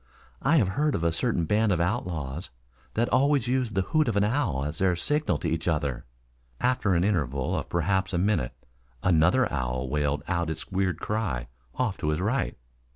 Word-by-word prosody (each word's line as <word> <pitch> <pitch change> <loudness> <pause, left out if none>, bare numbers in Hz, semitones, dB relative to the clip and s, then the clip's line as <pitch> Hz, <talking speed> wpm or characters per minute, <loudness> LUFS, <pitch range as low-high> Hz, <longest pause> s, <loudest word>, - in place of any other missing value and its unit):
"I 155 +4 +4
have 105 -10 +3
heard 145 +8 +1
of 85 - -2
a 85 - +3
certain 85 0 0
band 105 +3 +2
of 90 - +1
outlaws 85 - -2 0.5
that 120 +2 +2
always 140 -1 +3
used 125 -4 0
the 95 - +2
hoot 155 - +1
of 115 - 0
the 100 0 +3
owl 105 - 0
as 75 +2 -4
their 95 -2 +3
signal 145 - 0
to - - -3
each 80 +1 -2
other." 75 -6 -1 0.5
After 125 -7 +2
an 85 - +2
interval 70 -10 0
of - - -3
perhaps 95 +3 0
a 90 - 0
minute 90 - +1 0.5
another 90 +9 +4
owl 65 -1 -2
wailed 75 0 0
out 85 -2 0
its 80 +3 -5
weird 95 -3 0
cry 95 - -2 0.3
off 110 -7 -1
to 75 - -1
his 75 +1 0
right. 110 +9 -1
90 Hz, 190 wpm, -27 LUFS, 80-110 Hz, 0.5 s, I